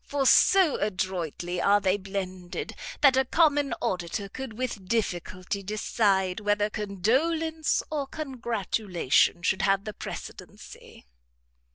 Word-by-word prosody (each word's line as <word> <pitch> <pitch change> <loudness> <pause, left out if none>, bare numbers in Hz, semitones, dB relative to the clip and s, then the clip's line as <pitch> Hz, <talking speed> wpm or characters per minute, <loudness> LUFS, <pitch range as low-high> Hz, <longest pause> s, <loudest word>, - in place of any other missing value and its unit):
For 280 -1 -2
so 365 +3 +5
adroitly 180 -3 -2
are 205 +1 +4
they 190 -1 +2
blended, 190 -2 -5 0.3
that 275 -3 +6
a 265 - +4
common 290 0 +2
auditor 185 +2 -3
could 250 -1 -7
with 235 -7 -4
difficulty 185 -2 -2
decide, 195 -2 0
whether 205 0 +1
condolence, 275 - 0
or 290 -3 -2
congratulation 220 - 0
should 190 +2 +1
have 195 0 +2
the 215 - -6
precedency." - - -10
205 Hz, 110 wpm, -27 LUFS, 185-265 Hz, 0.3 s, that